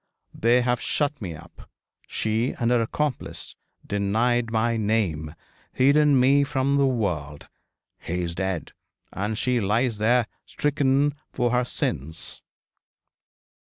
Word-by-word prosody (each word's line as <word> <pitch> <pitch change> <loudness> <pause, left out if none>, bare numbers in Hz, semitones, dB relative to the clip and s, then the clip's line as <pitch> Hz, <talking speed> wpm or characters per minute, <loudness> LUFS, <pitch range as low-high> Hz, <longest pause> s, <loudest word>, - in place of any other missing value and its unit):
They 120 +2 +3
have 120 -1 0
shut 145 -2 -1
me 90 -5 -5
up 80 - -15 0.4
she 110 +3 -1
and 120 -1 +1
her 120 -1 +3
accomplice 140 +4 -3 0.3
denied 115 +4 +1
my 115 +1 +1
name 100 -9 -1 0.4
hidden 140 +1 +4
me 135 +3 +5
from 140 0 0
the 140 -1 +4
world. 85 - -2 0.5
He 90 +2 -3
is 85 -1 -3
dead, 95 -1 -3 0.4
and 105 +3 -2
she 125 +1 +1
lies 110 +3 0
there 120 +2 +3 0.2
stricken 145 -1 +1 0.2
for 120 -2 0
her 125 0 +2
sins.' 80 - -4
115 Hz, 120 wpm, -25 LUFS, 100-130 Hz, 0.5 s, me